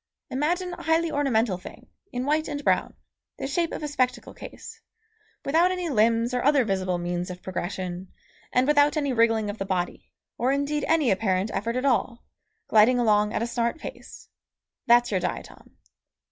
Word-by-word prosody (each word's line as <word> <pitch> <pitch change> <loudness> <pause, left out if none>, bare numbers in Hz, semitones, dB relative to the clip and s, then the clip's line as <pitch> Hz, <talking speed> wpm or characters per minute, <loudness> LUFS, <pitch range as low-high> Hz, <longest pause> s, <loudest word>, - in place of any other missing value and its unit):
Imagine 350 +7 -1
a - - -8
highly 325 0 +1
ornamental 235 -9 +1
thing - - -12 0.3
in 250 -1 -3
white 310 +2 +1
and 290 0 -4
brown, - - +1 0.4
the - - -4
shape 330 +5 -1
of - - -5
a - - -1
spectacle 255 -3 -1
case, - - -11 0.6
without 330 +5 +3
any 360 -2 -2
limbs 230 0 +2
or 250 - 0
other 280 -3 +4
visible 185 -3 -1
means 175 +1 -3
of 180 0 -8
progression, 185 0 -4 0.4
and 250 +1 +3
without 295 +1 +4
any 285 -3 0
wriggling 225 -2 +2
of 205 +1 -5
the - - -1
body, 180 -2 -3 0.3
or 250 +2 +2
indeed 285 +1 -1
any 315 -6 +3
apparent 190 +1 0
effort 230 +3 -2
at 255 +2 -1
all, 245 -2 0 0.4
gliding 225 +4 +5
along 210 -3 +3
at 220 - -1
a - - 0
smart 235 +3 -1
pace. - - -10 0.6
That's 240 0 +5
your 190 - +1
diatom. 180 - -6
240 Hz, 175 wpm, -25 LUFS, 205-290 Hz, 0.6 s, gliding